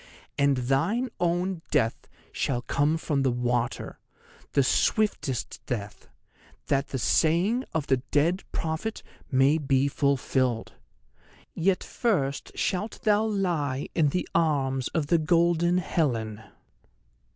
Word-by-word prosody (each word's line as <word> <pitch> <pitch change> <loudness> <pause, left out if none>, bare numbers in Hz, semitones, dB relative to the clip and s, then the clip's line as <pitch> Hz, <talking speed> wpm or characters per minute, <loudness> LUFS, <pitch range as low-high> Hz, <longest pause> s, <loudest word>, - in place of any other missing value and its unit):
And 140 -1 +2
thine 165 - 0
own 175 +1 0
death 115 -7 0 0.2
shall 120 -2 -1
come 145 +5 +1
from 150 -3 -1
the 135 - +2
water—the 120 +3 -3
swiftest 145 - 0
death—that 125 +4 -5
the 135 - -4
saying 175 - +2
of 160 -3 -1
the 130 - +2
dead 165 +6 +2
prophet 165 +8 -3 0.3
may 135 +4 +4
be 135 -1 +2
fulfilled. 130 -4 0 0.8
Yet 185 +2 +1
first 140 - -1
shalt 205 +4 -2
thou 215 0 +3
lie 170 -10 -1
in 155 -4 +3
the 180 +5 -2
arms 135 -6 +1
of 160 -4 -1
the 170 +3 +3
golden 170 +2 +3
Helen." 115 -12 -1
150 Hz, 110 wpm, -27 LUFS, 135-175 Hz, 0.8 s, may